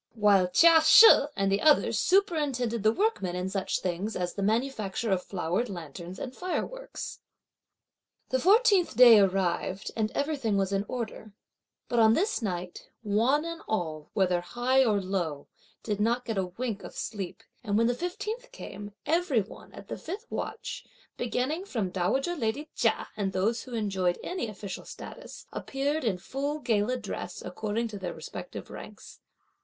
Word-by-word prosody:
While 205 -4 +4
Chia 325 - +6
She 435 +8 +10 0.3
and 195 -1 +1
the 195 - +1
others 300 -1 +4
superintended 290 - +1
the 215 +2 +4
workmen 225 - 0
in 180 +1 -2
such 195 -2 -1
things 185 +4 -2
as 180 -1 -2
the 200 - -4
manufacture 220 -1 -1
of 185 -1 +2
flowered 185 +5 -2
lanterns 175 0 -8
and 255 -1 -6
fireworks. - - -5 1.1
The 260 - +1
fourteenth 395 - +4
day 240 -3 +9
arrived 190 0 0
and 215 -1 0
everything 280 -8 0
was 195 0 0
in 195 +1 0
order; 220 -3 -5 0.5
but 240 - +1
on 220 -1 +6
this 405 - 0
night, 180 -4 -5
one 235 +9 +2
and 335 0 -5
all 160 -8 -3
whether 180 -3 +2
high 250 +8 +2
or 215 -5 +2
low, 175 -7 -3 0.4
did 210 -2 -2
not 235 +4 +1
get 220 -4 -1
a 185 - -1
wink 215 +3 -4
of - - -9
sleep; 200 -5 -5 0.2
and 205 -3 0
when 230 - +4
the 240 - +2
fifteenth 425 - -5
came, 205 - -9
every 320 -8 +2
one, 195 - -12
at - - -12
the - - -6
fifth 395 +8 -6
watch, - - -5 0.3
beginning 255 +8 -1
from 220 - -3
dowager 265 - 0
lady 285 +3 -2
Chia 230 - +1
and 200 -3 -2
those 215 +5 0
who 250 -2 -7
enjoyed 190 -5 0
any 360 -9 -3
official 200 -3 -7
status, - - -10
appeared 285 +3 -2
in 215 -6 0
full 275 +10 -3
gala 240 -3 0
dress, 200 -5 -6
according 215 +5 -2
to 205 -2 -7
their 185 - -5
respective - - -8
ranks. - - -11
220 Hz, 160 wpm, -28 LUFS, 195-275 Hz, 1.1 s, She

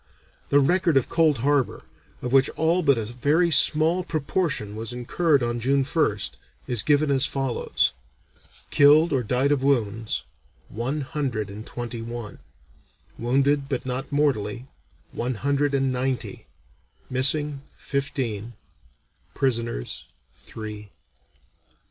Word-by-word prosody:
The 145 - +5
record 170 +1 +2
of 130 - +1
Cold 160 -4 +3
Harbor, 145 -3 +1 0.4
of 125 +1 -3
which 135 0 +5
all 165 +3 +2
but 140 -6 +3
a 110 - -2
very 145 +9 +1
small 160 +4 +5
proportion 155 - -2
was 115 +2 -4
incurred 140 +3 +1
on 120 0 -2
June 135 +3 +1
1st, 140 -7 0 0.3
is 120 -4 +1
given 145 0 +2
as 135 0 +3
follows: 135 -3 -1 0.8
Killed 150 +3 +5
or 135 - +2
died 125 +5 +1
of 145 -3 +1
wounds, 115 -5 0 0.5
one 130 +8 -3
hundred 130 -8 -3
and 105 +2 -9
twenty 120 -1 -6
one; 115 -2 -7 0.8
wounded, 140 +3 +1
but 130 -3 -3
not 130 +2 -4
mortally, 125 -6 0 0.5
one 125 +1 -3
hundred 140 +3 0
and 135 -1 +1
ninety; 130 0 -3 0.6
missing, 140 +2 +3 0.2
fifteen; 120 -5 -3 0.8
prisoners, 115 - -2 0.3
three. 105 -2 -9
135 Hz, 120 wpm, -24 LUFS, 120-145 Hz, 0.8 s, The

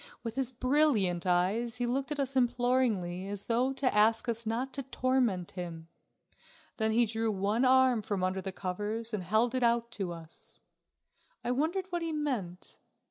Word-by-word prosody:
With 230 -2 -4
his 265 -1 +1
brilliant 255 - +2
eyes 195 +7 +1
he 245 0 -1
looked 265 +4 -2
at 295 - -2
us 270 -1 0
imploringly 245 -7 +1
as 200 0 -4
though 245 +3 +1
to 265 -3 0
ask 220 +3 +3
us 230 -1 -2
not 245 +4 -2
to 275 - -2
torment 255 -8 0
him. 170 -3 -7 0.9
Then 220 -1 +1
he 235 +2 +3
drew 225 0 -1
one 205 +4 0
arm 260 -2 +5
from 200 -2 -2
under 185 +1 0
the 190 - -4
covers 210 +5 -4
and 210 - -1
held 220 +7 +1
it 255 - 0
out 235 0 +2
to 195 -6 -3
us. 165 -1 -10 0.8
I 245 - -1
wondered 320 +9 0
what 345 -1 -1
he 330 -1 -2
meant. 240 - -4
230 Hz, 175 wpm, -30 LUFS, 195-255 Hz, 0.9 s, arm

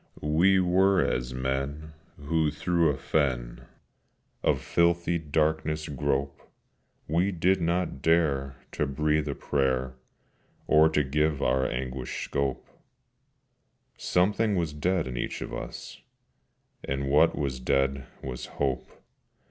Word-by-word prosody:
We 95 +4 +5
were 95 +2 +3
as - - -2
men 70 +4 -3 0.2
who 80 +1 0
through 85 +2 +1
a 70 - -1
fen 65 -6 -1 0.7
Of - - +2
filthy 85 0 +1
darkness 75 0 0
grope: 70 -1 -2 0.7
We 85 +6 +1
did 90 +1 +1
not 85 -4 -1
dare 70 -5 +2 0.2
to 75 - -1
breathe 75 +2 0
a 70 - -2
prayer, 65 -2 0 0.7
Or 80 +1 +5
to 75 -2 +1
give 75 +2 0
our 65 +1 +2
anguish 65 0 -4
scope: 70 -2 -2 1.3
Something 100 +4 +1
was 85 -4 -1
dead 85 +3 0
in 65 -1 -5
each - - -3
of - - -8
us, - - -7 0.8
And 70 0 -2
what 75 +4 +4
was 70 -3 -2
dead 70 +2 0 0.2
was 65 -2 -5
Hope. 65 -2 -1
75 Hz, 120 wpm, -27 LUFS, 65-85 Hz, 1.3 s, We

